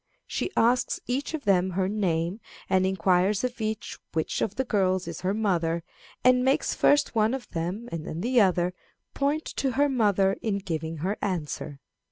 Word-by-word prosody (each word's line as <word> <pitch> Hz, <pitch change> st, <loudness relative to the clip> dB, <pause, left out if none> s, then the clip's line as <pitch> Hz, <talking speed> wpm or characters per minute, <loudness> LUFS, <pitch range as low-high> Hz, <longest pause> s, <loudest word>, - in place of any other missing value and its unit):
She -, -, -2 dB
asks 245 Hz, +2 st, +2 dB
each 270 Hz, +6 st, -2 dB
of 305 Hz, -, -6 dB
them 190 Hz, -2 st, +3 dB
her 185 Hz, +1 st, 0 dB
name, 185 Hz, -2 st, -1 dB, 0.3 s
and 190 Hz, 0 st, +3 dB
inquires 190 Hz, +2 st, +2 dB
of 245 Hz, -2 st, -3 dB
each 215 Hz, -1 st, -3 dB
which 160 Hz, -2 st, -1 dB
of 210 Hz, -, -1 dB
the 265 Hz, -, 0 dB
girls 185 Hz, -5 st, +1 dB
is -, -, -6 dB
her 190 Hz, +2 st, 0 dB
mother, 170 Hz, -6 st, 0 dB, 0.4 s
and 250 Hz, 0 st, +5 dB
makes 265 Hz, +1 st, +2 dB
first 290 Hz, 0 st, +3 dB
one 220 Hz, +2 st, +2 dB
of 265 Hz, -, -7 dB
them, 180 Hz, +7 st, -3 dB
and 165 Hz, -2 st, -5 dB
then 160 Hz, -, -4 dB
the 245 Hz, +2 st, +3 dB
other, 180 Hz, -2 st, +2 dB, 0.4 s
point 290 Hz, +3 st, 0 dB
to 270 Hz, -2 st, 0 dB
her 285 Hz, +2 st, +3 dB
mother 200 Hz, -6 st, +2 dB
in 210 Hz, -3 st, 0 dB
giving 165 Hz, -4 st, -4 dB
her 200 Hz, +3 st, -1 dB
answer. 155 Hz, -6 st, -3 dB
195 Hz, 180 wpm, -27 LUFS, 180-240 Hz, 0.4 s, and